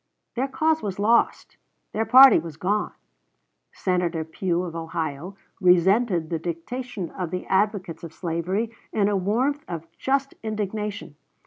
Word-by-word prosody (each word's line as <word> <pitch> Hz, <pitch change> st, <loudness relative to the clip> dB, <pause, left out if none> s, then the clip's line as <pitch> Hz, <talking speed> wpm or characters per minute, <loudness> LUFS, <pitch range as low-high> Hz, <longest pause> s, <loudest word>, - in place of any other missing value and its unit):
Their 260 Hz, +3 st, 0 dB
cause 315 Hz, +3 st, +1 dB
was 195 Hz, -3 st, -4 dB
lost 225 Hz, +4 st, +1 dB, 0.4 s
their 220 Hz, +1 st, 0 dB
party 265 Hz, -3 st, +9 dB
was 160 Hz, -2 st, -8 dB
gone. 205 Hz, +5 st, -1 dB, 0.8 s
Senator 175 Hz, -3 st, -1 dB
Pugh, 170 Hz, +2 st, -2 dB
of 170 Hz, -2 st, -6 dB
Ohio, 165 Hz, +2 st, -4 dB, 0.2 s
resented 180 Hz, -1 st, +3 dB
the 165 Hz, -, -1 dB
dictation 190 Hz, +4 st, -5 dB
of 180 Hz, -3 st, -4 dB
the 180 Hz, +2 st, -4 dB
advocates 190 Hz, -4 st, 0 dB
of 165 Hz, -, -7 dB
slavery 180 Hz, +7 st, -2 dB, 0.2 s
in 205 Hz, -2 st, +2 dB
a 205 Hz, -, +1 dB
warmth 245 Hz, +10 st, 0 dB
of 165 Hz, -2 st, -5 dB
just 275 Hz, 0 st, 0 dB
indignation. 210 Hz, -6 st, -4 dB
190 Hz, 135 wpm, -24 LUFS, 170-220 Hz, 0.8 s, party